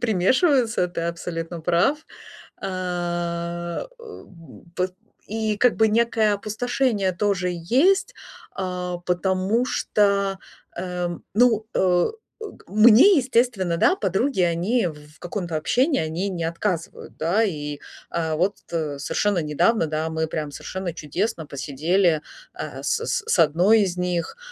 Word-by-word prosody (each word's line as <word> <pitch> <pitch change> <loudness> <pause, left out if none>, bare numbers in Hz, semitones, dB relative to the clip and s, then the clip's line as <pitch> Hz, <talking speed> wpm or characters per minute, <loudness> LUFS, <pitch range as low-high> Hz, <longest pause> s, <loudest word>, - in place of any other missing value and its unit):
примешиваются, 235 - +2
ты 175 -1 -4
абсолютно 170 0 -4
прав. 175 - +2 0.6
А, 175 - -3
э, - - -16
м, 185 - -13
и - - -22
пот 185 0 -1 0.3
и 215 -1 -1
как 250 +1 +4
бы 220 0 +4
некое 220 -1 +2
опустошение 215 -1 -1
тоже 185 -1 0
есть. 260 - +2 0.4
А, 180 -1 -3
потому 185 +5 0
что, 200 -4 +1 0.4
э, 180 0 -3
м, 175 -1 -6
ну, 225 -1 +3
э, 180 - +2 0.3
э, - - -6
к - - -20
мне, 230 - +7
естественно, 235 -9 +1
да, 370 - +4
подруги, 195 - 0
они 180 +7 +1
в 155 - -9 0.2
в - - -24
каком-то 175 -3 -4
общении, 265 - +1
они 160 +5 -2
не 170 -3 -3
отказывают, 170 +1 -3
да. 175 +8 +2
И, 150 -7 -4 0.3
э, 160 -2 -1
вот, 190 +5 +1 0.2
э, 155 -4 -2
совершенно 190 +7 0
недавно, 165 +7 +2
да, 155 +1 -2
мы 160 0 -1
прямо 155 -2 -4
совершенно 185 +4 -5
чудесно 165 +2 -3
посидели, 155 +5 +1 0.3
а, - - -7
с 460 - 0
с 485 -3 -1
с 460 - +1
одной 180 +8 +5
из 185 -3 -1
них, 180 - -2
185 Hz, 140 wpm, -23 LUFS, 170-220 Hz, 0.6 s, мне